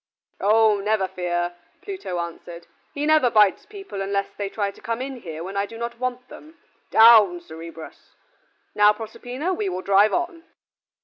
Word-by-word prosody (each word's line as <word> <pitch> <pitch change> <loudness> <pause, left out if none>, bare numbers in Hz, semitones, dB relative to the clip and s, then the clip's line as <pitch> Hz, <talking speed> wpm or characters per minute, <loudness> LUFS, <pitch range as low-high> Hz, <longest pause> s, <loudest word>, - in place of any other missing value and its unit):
"Oh, 215 0 +4
never 210 -1 0
fear," 175 -1 -2 0.3
Pluto 380 - -5
answered; 170 0 -7 0.3
"he 290 +1 -3
never 310 -5 +4
bites 215 - +3
people 390 - -8
unless 200 0 -1
they 200 -1 -4
try 200 -1 -2
to - - -19
come 230 0 -3
in 265 0 -5
here 165 -7 -8
when 190 +2 -7
I 200 0 0
do 225 - -11
not 235 0 -5
want 250 0 -4
them. 315 +5 -14 0.3
Down, 220 -6 +7
Cerberus. 165 -1 -12 0.6
Now, 210 0 +5
Proserpina, 245 - -5
we 210 - -2
will 185 0 -5
drive 200 +2 +4
on." 345 -1 -2
210 Hz, 165 wpm, -23 LUFS, 185-250 Hz, 0.6 s, Down